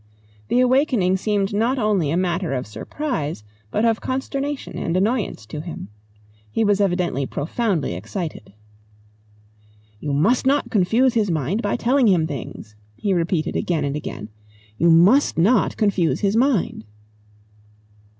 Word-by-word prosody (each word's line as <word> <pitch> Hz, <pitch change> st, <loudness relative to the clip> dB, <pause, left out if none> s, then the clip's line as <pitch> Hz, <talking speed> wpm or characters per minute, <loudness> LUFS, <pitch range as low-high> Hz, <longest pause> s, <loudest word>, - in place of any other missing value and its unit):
The 250 Hz, -, +2 dB
awakening 250 Hz, -8 st, +2 dB
seemed 205 Hz, 0 st, -1 dB
not 230 Hz, +6 st, +1 dB
only 210 Hz, -, +1 dB
a 165 Hz, -, 0 dB
matter 180 Hz, -3 st, -1 dB
of 125 Hz, -, -3 dB
surprise 155 Hz, -, -4 dB, 0.3 s
but 215 Hz, -, 0 dB
of 225 Hz, -1 st, +1 dB
consternation 275 Hz, +2 st, -3 dB
and 170 Hz, +2 st, -1 dB
annoyance 205 Hz, -, -1 dB
to 150 Hz, +8 st, -6 dB
him. 160 Hz, -, -8 dB, 0.6 s
He 225 Hz, -, 0 dB
was 205 Hz, -1 st, +2 dB
evidently 175 Hz, -8 st, 0 dB
profoundly 175 Hz, -, -1 dB
excited. 110 Hz, -, -6 dB, 1.5 s
"You 145 Hz, -, -4 dB
must 200 Hz, -, +2 dB
not 285 Hz, +2 st, +1 dB
confuse 225 Hz, +6 st, +3 dB
his 215 Hz, -4 st, +1 dB
mind 165 Hz, -, -1 dB
by 205 Hz, -, -1 dB
telling 250 Hz, +1 st, +2 dB
him 175 Hz, -5 st, +3 dB
things," 120 Hz, -7 st, -7 dB, 0.2 s
he 195 Hz, -, -1 dB
repeated 170 Hz, -2 st, -1 dB
again 160 Hz, -5 st, 0 dB
and 140 Hz, 0 st, -2 dB
again. 110 Hz, -7 st, -6 dB, 0.5 s
"You 170 Hz, +9 st, +3 dB
must 185 Hz, -, +5 dB
not 200 Hz, +6 st, +3 dB
confuse 200 Hz, -6 st, +1 dB
his 200 Hz, +1 st, +1 dB
mind." 240 Hz, -, +1 dB
190 Hz, 140 wpm, -22 LUFS, 160-230 Hz, 1.5 s, must